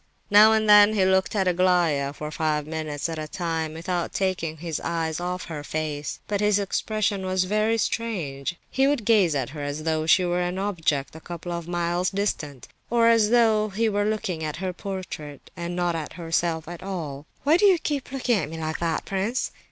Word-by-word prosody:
Now 210 +2 +8
and 220 -1 +2
then 210 0 +8
he 190 -3 +3
looked 190 +3 +2
at 190 -2 +1
Aglaya 175 -6 +2
for 150 +1 -7
five 155 -1 -1
minutes 155 -1 -3
at 165 -1 -4
a 155 - -4
time, 160 -2 -3
without 170 +1 -3
taking 180 -5 -1
his 165 -1 -4
eyes 165 -1 -2
off 180 +1 -3
her 155 -3 -6
face; 150 -1 -4
but 205 -1 -1
his 210 -1 +3
expression 205 0 -1
was 185 0 +1
very 215 +4 +1
strange; 175 - -2 0.2
he 270 +1 +3
would 280 -7 0
gaze 200 -9 +4
at 130 -4 -1
her 150 -1 -7
as 145 +2 -4
though 160 -1 0
she 180 +3 +5
were 175 0 0
an 180 +1 -2
object 160 -8 -1
a - - -8
couple 175 +1 -7
of 170 -1 -4
miles 175 +1 0
distant, 155 - -3 0.2
or 230 -1 +4
as 225 -2 +4
though 220 -3 +3
he 220 +3 0
were 205 -1 +1
looking 200 -7 -2
at 155 -1 -3
her 185 +2 -3
portrait 180 -7 -7
and 175 0 -4
not 175 -1 0
at 160 -2 -5
herself 165 -1 -1
at 175 0 -8
all. 160 -7 -5 0.2
"Why 305 +4 +5
do 410 - +3
you 375 -3 +5 0.3
look 270 -1 -5
at 200 - +2
me 165 - -7
like 160 -1 -3
that, 165 -2 -1
prince?" 200 +6 -1
175 Hz, 200 wpm, -25 LUFS, 160-205 Hz, 0.3 s, Now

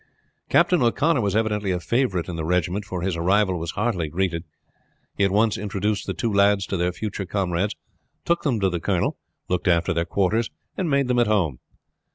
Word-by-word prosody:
Captain 180 -5 +4
O'Connor 135 +4 +2
was 100 -2 0
evidently 105 -2 0
a 90 -1 0
favorite 95 -1 0
in 90 - -5
the 80 - -3
regiment, 90 +4 0
for 90 -3 -4
his 95 -2 0
arrival 95 +2 +2
was 85 0 -4
heartily 95 -5 -1
greeted. 85 0 -1 0.7
He 100 - +1
at 100 - +4
once 105 +1 +2
introduced 105 +1 -2
the - - -2
two 115 -3 -1
lads 100 -1 +4
to - - -3
their 90 +1 +1
future 100 +1 -5
comrades, 95 0 -1 0.5
took 170 0 +1
them 130 -7 0
to 95 - +3
the 85 - -2
colonel, - - -1 0.3
looked 90 +1 -1
after 85 -2 +3
their 85 0 0
quarters, 100 +6 +1 0.3
and 180 -4 -1
made 140 -2 +2
them 125 -1 +2
at 120 - +3
home. 90 - +1
100 Hz, 200 wpm, -23 LUFS, 90-110 Hz, 0.7 s, Captain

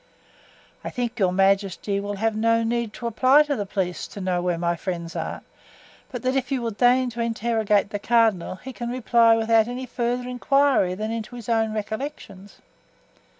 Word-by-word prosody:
"I - - -4
think 245 -1 -4
your 185 -3 +3
majesty 195 +1 +1
will 205 0 -4
have 220 +2 -1
no 230 +1 +2
need 235 -1 -1
to 240 - -8
apply 255 +6 +4
to 295 -1 -2
the 205 -5 -4
police 185 -3 -3
to - - -10
know 185 -2 -1
where 175 -1 -1
my 170 0 0
friends 170 -1 -5
are, - - -4 0.7
but 245 -3 -6
that 255 +1 0
if 260 -1 -1
you 270 - +1
will 230 - -1
deign 245 +3 +3
to 235 0 -5
interrogate 220 -3 0
the 205 - -3
cardinal 220 -5 +2
he 255 +7 -10
can 240 0 -5
reply 235 -2 +4
without 225 0 +3
any 250 +1 -5
further 245 0 -2
inquiry 250 -6 +2
than 215 +3 -3
into 230 +1 -5
his 240 -2 -9
own 225 -1 +1
recollections." 215 -3 -6
225 Hz, 185 wpm, -24 LUFS, 200-245 Hz, 0.7 s, apply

